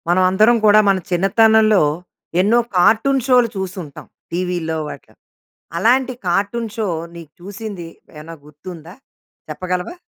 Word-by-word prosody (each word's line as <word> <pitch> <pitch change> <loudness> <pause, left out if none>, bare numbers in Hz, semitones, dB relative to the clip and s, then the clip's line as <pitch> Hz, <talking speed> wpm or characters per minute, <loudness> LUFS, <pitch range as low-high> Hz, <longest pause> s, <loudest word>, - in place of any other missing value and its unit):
మనం 180 +2 +3
అందరం 215 +5 +3
కూడా 210 0 +6
మన 195 - +3
చిన్నతనంలో 215 +3 +3 0.6
ఎన్నో 220 +5 +3 0.2
కార్టూన్ 230 +9 +3
షోలు 250 -2 +4
చూసి 190 0 -5
ఉంటాం. 145 -3 -12 0.3
టీవీ‌లో 175 -2 -3
వాటిలో 140 - -11 0.6
అలాంటి 250 +8 +2
కార్టూన్ 205 +6 -1
షో 220 -2 -2 0.3
నీకు 165 -3 -11
చూసింది 200 -2 -8 0.3
ఏమైనా 160 +2 -10
గుర్తుందా? 160 +3 -12 0.6
చెప్పగలవా? 180 - -4
190 Hz, 120 wpm, -18 LUFS, 175-225 Hz, 0.6 s, కూడా